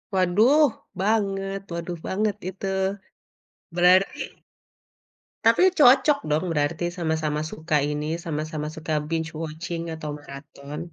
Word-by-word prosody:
Waduh 215 - +5 0.4
banget 195 -2 0
waduh 170 0 -4
banget 205 +2 0
itu. 195 +1 -6 1.1
Berarti 180 +2 +4 1.3
Tapi - - +5 0.2
cocok 275 +2 +6
dong 155 +5 +1
berarti 155 +3 0
sama-sama 160 -2 -1
suka 155 0 -2 0.2
ini, 150 +1 -3 0.2
sama-sama 155 -1 -3
suka 160 0 -4 0.2
binge 165 0 -2
watching 165 +2 -4
atau 155 -1 -6
maraton. 140 +1 -9
165 Hz, 105 wpm, -25 LUFS, 155-195 Hz, 1.3 s, cocok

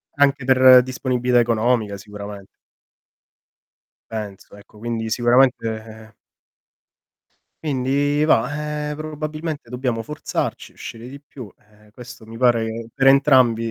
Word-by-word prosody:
Anche 140 -1 +2
per 130 -1 +7
disponibilità 125 -1 0
economica, 115 -2 +1
sicuramen 100 0 -9 1.6
Penso 105 -3 -8
ecco, 100 +1 -18
quindi 115 0 -4
sicuramente 115 -3 0 1.5
Quindi 145 +1 0
va, 150 +3 0
ehm, - - -5
probabilmente 155 -1 -6
dobbiamo 125 -2 -2
forzarci, 150 +5 -4
uscire 115 +1 -10
di 140 +2 -11
più, 135 -5 -11
ehm, 105 0 -25
questo 120 0 -12
mi 115 +1 -11
pare 120 -2 +2
che 115 +1 -6
per 135 +2 -1
entrambi 130 -4 +4
125 Hz, 110 wpm, -21 LUFS, 110-140 Hz, 1.6 s, per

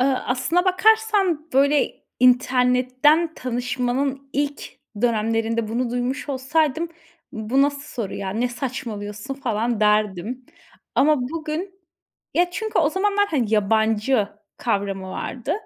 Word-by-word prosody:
Iıı, 265 -1 +3
aslına 285 +8 +1
bakarsan, 385 -4 +3
böyle, 280 +2 +2 0.2
internetten 255 +5 +3
tanışmanın 255 +2 -2
ilk 285 +1 -1 0.4
dönemlerinde 225 -1 +1
bunu 235 +2 -1
duymuş 250 +4 -2
olsaydım 300 +4 0 0.4
"Bu 220 +5 +1
nasıl 285 0 0 0.2
soru 195 - -5
ya? 195 -1 -4
Ne 230 +5 0
saçmalıyorsun?" 235 -2 -5
falan 235 -4 -1
derdim. 210 +3 +1 0.5
Ama 305 +2 +4
bugün 330 +7 -5 0.5
ya, 355 +1 +3
çünkü 435 +5 -2
o 300 - +4
zamanlar, 405 +2 +1
hani, 235 - 0
yabancı 220 +2 +2 0.3
kavramı 195 -4 -2
vardı. 245 +4 -4
255 Hz, 110 wpm, -23 LUFS, 225-300 Hz, 0.5 s, Ama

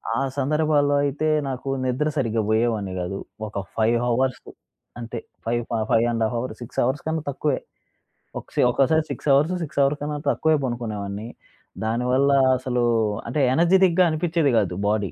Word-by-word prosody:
ఆ - - 0 0.2
సందర్భాల్లో 145 0 +2
అయితే 145 +2 -1 0.2
నాకు 130 0 -5 0.2
నిద్ర 130 +5 0
సరిగ్గా 115 -4 0
బోయేవాన్ని 110 -3 0
గాదు. 90 +2 -4 0.3
ఒక 105 -1 -5 0.2
5 115 +1 +2
హవర్స్ 125 +2 0 0.6
అంతే. 115 0 -5 0.3
Five 120 +1 0 0.3
five 115 0 +4
and 115 -1 0
half 110 - 0
hours, 115 -2 -5
6 120 - -6
hours 130 +4 -1
కన్నా 160 -1 -1
తక్కువే. 140 0 -1 0.8
ఒక - - -7
సి - - +3
ఒక్కోసారి 140 +5 +2
6 - - -6
అవర్స్, 150 +6 +3
6 145 - -4
అవర్ 140 +2 +2
కన్నా 150 0 -3
తక్కువే 160 0 +2
పనుకునేవాన్ని. 110 -4 -4 0.6
దానివల్ల 125 +5 +2 0.3
అసలు 125 -1 -1 0.4
అంటే 125 +6 -2
ఎనర్జిటిక్‌గా 180 +3 +4
అనిపించేది 160 -2 +1
గాదు 95 -5 +1
బాడీ. 105 -2 0
130 Hz, 150 wpm, -23 LUFS, 115-150 Hz, 0.8 s, Five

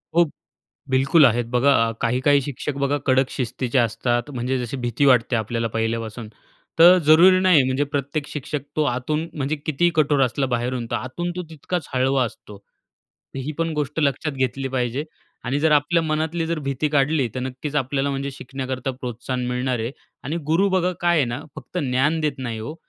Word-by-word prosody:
हो. 175 - +6 0.7
बिल्कुल 135 +4 +5
आहेत. 120 -1 +2
बघा 125 -2 +3
काही-काही 130 +4 +3
शिक्षक 140 +1 -4
बघा 140 +1 +1
कडक 130 0 +3
शिस्तीचे 125 0 -2
असतात. 120 +3 0
म्हणजे 125 +1 -2
जशी 125 +2 -4
भीती 120 +2 0
वाटते 125 -2 +4
आपल्याला 115 +1 -1
पहिल्यापासून. 115 0 -2 0.5
तर 175 +2 +9
जरुरी 175 +5 +7
नाही 185 -7 +5
म्हणजे 130 +2 0
प्रत्येक 145 0 -3
शिक्षक 150 0 -4 0.2
तो 155 - +2
आतून 150 +6 -2
म्हणजे 145 +1 -2
कितीही 160 +3 +2
कठोर 145 -2 +3
असला 135 +2 0
बाहेरून, 120 0 -1
तर - - +1
आतून 175 +8 -4
तो 180 - -3
तितकाच 160 +1 -4
हळवा 130 +1 +2
असतो. 105 -2 -10 0.8
ही 135 +3 -4
पण 165 -1 0
गोष्ट 150 +1 -2
लक्षात 145 +1 0
घेतली 135 0 -2
पाहिजे 130 +2 -2 0.4
आणि 135 +3 0
जर 160 0 +3
आपल्या 150 +3 +3
मनातली 160 +1 -1
जर 165 0 -2
भीती 140 +3 0
काढली. 145 -2 +2
तर 130 - -3
नक्कीच 130 +3 -5
आपल्याला 135 +1 0
म्हणजे 140 0 -3
शिकण्याकरता 130 0 -5
प्रोत्साहन 125 +1 -4
मिळणार 125 0 -1
आहे 115 +3 -2 0.3
आणि 150 +6 -2
गुरु 195 +5 +3
बघा 185 -1 +1
काय 175 0 +3
आहे 150 - +4
ना, 120 +3 -4 0.2
फक्त 180 - -6
ज्ञान 145 +3 +1
देत 150 -3 -1
नाही 120 -4 -4
ओ. 115 +8 -6
135 Hz, 175 wpm, -22 LUFS, 125-155 Hz, 0.8 s, तर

